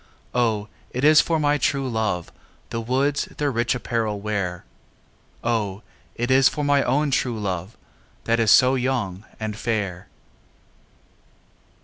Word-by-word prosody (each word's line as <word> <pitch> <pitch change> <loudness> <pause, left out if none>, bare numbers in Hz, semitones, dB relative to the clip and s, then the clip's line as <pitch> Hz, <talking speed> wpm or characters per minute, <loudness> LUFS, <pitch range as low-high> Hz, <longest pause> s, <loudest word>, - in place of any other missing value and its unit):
O, 110 -4 +1 0.2
it 125 - -4
is 155 +1 +7
for 165 -2 0
my 145 0 +2
true 135 0 0
love 110 -7 -2 0.4
The 115 - -2
woods 135 +5 0
their 145 -1 0
rich 120 0 0
apparel 115 -4 -2
wearâ 100 -4 -3 0.8
O, 110 -4 -1 0.3
it 120 +2 -1
is 130 0 +6
for 150 - -4
my 145 -1 +3
own 145 +3 +1
true 120 -3 0
love, 95 0 -4 0.5
That 115 0 +1
is 115 -2 +3
so 130 +5 +6
young 120 -7 -1
and 110 -1 -3
fair. 105 -6 -3
115 Hz, 135 wpm, -23 LUFS, 105-135 Hz, 0.8 s, is